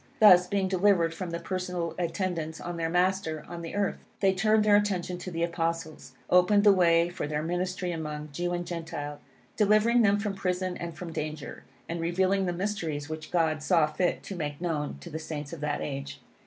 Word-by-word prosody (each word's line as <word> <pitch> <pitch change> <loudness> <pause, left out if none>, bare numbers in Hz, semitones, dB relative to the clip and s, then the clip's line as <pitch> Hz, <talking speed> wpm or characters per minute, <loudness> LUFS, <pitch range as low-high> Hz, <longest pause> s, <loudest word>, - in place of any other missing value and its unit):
Thus, 180 -4 +8
being 195 0 0
delivered 185 -3 +3
from 180 +1 -5
the 170 0 -3
personal 180 -3 -3
attendance 170 -2 -2
on 175 0 -5
their 165 -1 -1
Master 180 -3 0
on 170 -1 -7
the 165 +2 -6
earth, 205 -1 -1 0.2
they 195 -1 +3
turned 215 +3 +3
their 205 -1 +6
attention 185 -4 0
to 180 - -6
the 165 -1 -2
Apostles, 165 -4 -3
opened 190 +3 +5
the 205 -1 +7
way 170 -2 +4
for 175 -4 -4
their 150 0 -2
ministry 180 +2 -2
among 150 -2 -5
Jew 175 +3 -2
and 175 0 -2
Gentile, 160 -4 -5 0.4
delivering 215 +3 +4
them 205 -2 +4
from 205 -1 -2
prison 185 -1 -2
and 170 -1 -6
from 170 0 -7
danger, 155 -1 -5 0.2
and 170 0 -3
revealing 190 +3 +1
the - - +1
mysteries 170 -6 -3
which 155 0 -6
God 160 -3 +1
saw 165 -1 +4
fit 170 +4 -1
to 195 - -6
make 145 -4 -4
known 160 -4 -2
to 170 - -9
the 160 - -4
Saints 155 -1 -6
of 160 - -7
that 150 -1 -1
age. 140 0 -5
175 Hz, 195 wpm, -28 LUFS, 160-185 Hz, 0.4 s, Thus